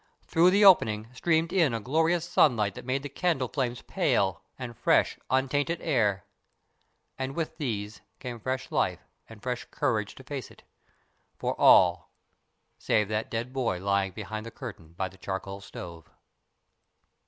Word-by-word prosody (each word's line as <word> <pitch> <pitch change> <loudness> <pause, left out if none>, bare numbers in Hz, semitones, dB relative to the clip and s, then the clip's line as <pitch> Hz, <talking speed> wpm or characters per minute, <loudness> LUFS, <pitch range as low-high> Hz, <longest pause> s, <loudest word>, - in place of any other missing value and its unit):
Through 170 +2 +4
the 200 +2 +4
opening 110 - +5
streamed 165 +4 +1
in 160 -10 +3
a - - -2
glorious 160 +8 +1
sunlight 105 - +3
that - - -10
made 135 +2 -1
the - - -3
candle 145 -2 0
flames 125 -2 -3
pale, 95 -1 +1 0.2
and 125 -2 -7
fresh, - - +2
untainted 145 +5 +1
air. 105 - +1 0.9
And 135 +1 -3
with 165 -2 -3
these 105 -7 -3 0.2
came 125 -3 -7
fresh 130 +3 -3
life - - 0 0.2
and 110 -2 -13
fresh 125 -1 -3
courage 110 -8 -1
to 130 - -12
face 130 -3 -6
it - - -18 0.7
for - - -1
all, - - +6 0.7
save 105 -1 +1
that 110 +1 -2
dead 115 +3 -4
boy 115 -9 -1
lying 100 0 0
behind 110 +3 -6
the 115 - -7
curtain 100 - -9
by 95 +2 -2
the 95 +1 -16
charcoal 95 +1 -5
stove. 85 -4 -10
120 Hz, 155 wpm, -28 LUFS, 105-140 Hz, 0.9 s, all